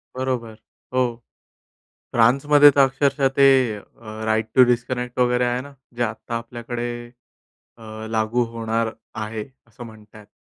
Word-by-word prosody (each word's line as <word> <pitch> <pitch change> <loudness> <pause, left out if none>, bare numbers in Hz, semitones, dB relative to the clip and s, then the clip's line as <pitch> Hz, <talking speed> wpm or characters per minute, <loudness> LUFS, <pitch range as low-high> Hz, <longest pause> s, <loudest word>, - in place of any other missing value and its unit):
बरोबर. 125 -4 -3 0.4
हो. 125 -2 +1 1.0
फ्रान्समध्ये 145 +5 +6
तर 140 - +3
अक्षरशः 135 0 +1
ते 140 0 +6 0.3
अ, - - -10 0.5
राइट 110 0 +1
टू 130 - +8
डिस्कनेक्ट 125 +1 -2
वगैरे 125 0 +2
आहे 120 +1 0
ना. 140 +2 -11 0.2
जे 120 - -2
आत्ता 115 +1 -4
आपल्याकडे 120 +1 -5 0.9
अ, - - -18 0.3
लागू 110 +2 0
होणार 115 0 -1 0.3
आहे 110 0 -5 0.2
असं 120 +1 -12
म्हणतायेत. 110 -1 -15
120 Hz, 125 wpm, -22 LUFS, 115-130 Hz, 1.0 s, टू